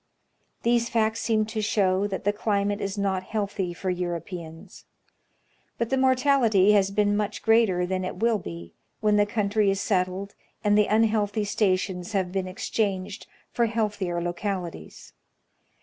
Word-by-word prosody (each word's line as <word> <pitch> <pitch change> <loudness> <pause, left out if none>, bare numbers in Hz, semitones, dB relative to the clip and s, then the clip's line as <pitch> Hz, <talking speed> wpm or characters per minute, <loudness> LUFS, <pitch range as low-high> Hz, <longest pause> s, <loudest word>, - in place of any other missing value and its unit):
These 235 0 +2
facts 220 -1 +1
seem 215 -2 +1
to 220 0 -3
show 200 -2 +1
that 195 -2 -5
the 205 - +1
climate 205 -1 -1
is 200 +1 -3
not 195 -2 0
healthy 200 -2 -3
for 185 +2 -3
Europeans. 170 -2 -6 0.9
But 235 +1 -2
the - - +3
mortality 255 -6 +4
has 200 -2 +4
been 205 0 +1
much 210 0 -2
greater 225 -6 +3
than 185 +1 -2
it 185 - -4
will 225 +2 +1
be 85 - -9 0.3
when 210 -1 +2
the 205 0 +3
country 205 -1 +1
is 195 0 0
settled 190 0 -1 0.3
and 205 -1 +3
the 210 -1 +4
unhealthy 215 -1 +2
stations 185 -1 -1
have 190 -3 0
been 190 -1 -2
ex 185 - -6
changed 200 -1 -2 0.2
for 235 -1 +1
healthier 210 -6 -1
localities. 175 - -5
205 Hz, 150 wpm, -26 LUFS, 185-215 Hz, 0.9 s, mortality